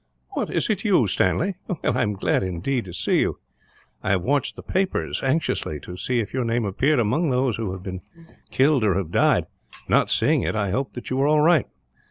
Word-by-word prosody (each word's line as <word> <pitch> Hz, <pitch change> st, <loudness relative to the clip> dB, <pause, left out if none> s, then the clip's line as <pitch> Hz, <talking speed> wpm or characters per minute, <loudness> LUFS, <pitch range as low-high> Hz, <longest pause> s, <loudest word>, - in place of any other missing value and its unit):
"What, -, -, -3 dB
is -, -, 0 dB
it 200 Hz, -3 st, -1 dB
you, 190 Hz, -, +4 dB
Stanley? 160 Hz, -, +1 dB, 0.3 s
I 125 Hz, +1 st, +1 dB
am 105 Hz, -, 0 dB
glad, 95 Hz, -, 0 dB
indeed, 95 Hz, +7 st, -2 dB
to 90 Hz, -, -8 dB
see -, -, +1 dB
you. -, -, 0 dB, 0.6 s
I -, -, -3 dB
have 95 Hz, -2 st, +2 dB
watched 140 Hz, +2 st, 0 dB
the -, -, -10 dB
papers 190 Hz, +1 st, -1 dB
anxiously, 130 Hz, -, -1 dB
to 90 Hz, -, -8 dB
see 125 Hz, +6 st, -1 dB
if 110 Hz, -, -4 dB
your 130 Hz, -1 st, 0 dB
name 115 Hz, -1 st, 0 dB
appeared 135 Hz, +10 st, +1 dB
among 125 Hz, +9 st, +1 dB
those 125 Hz, -3 st, +1 dB
who 110 Hz, -5 st, -3 dB
have 95 Hz, -1 st, -7 dB
been 95 Hz, -1 st, -6 dB, 0.5 s
killed 135 Hz, -2 st, +3 dB
or 100 Hz, -5 st, +2 dB
have 90 Hz, -4 st, -2 dB
died; -, -, +3 dB, 0.4 s
not -, -, +3 dB
seeing -, -, +2 dB
it, -, -, -2 dB
I 100 Hz, -3 st, 0 dB
hoped 130 Hz, +6 st, -2 dB
that 125 Hz, -, -7 dB
you 130 Hz, -, 0 dB
were 135 Hz, +2 st, +2 dB
all 150 Hz, 0 st, +4 dB
right. 165 Hz, +1 st, +4 dB
125 Hz, 215 wpm, -23 LUFS, 100-145 Hz, 0.6 s, you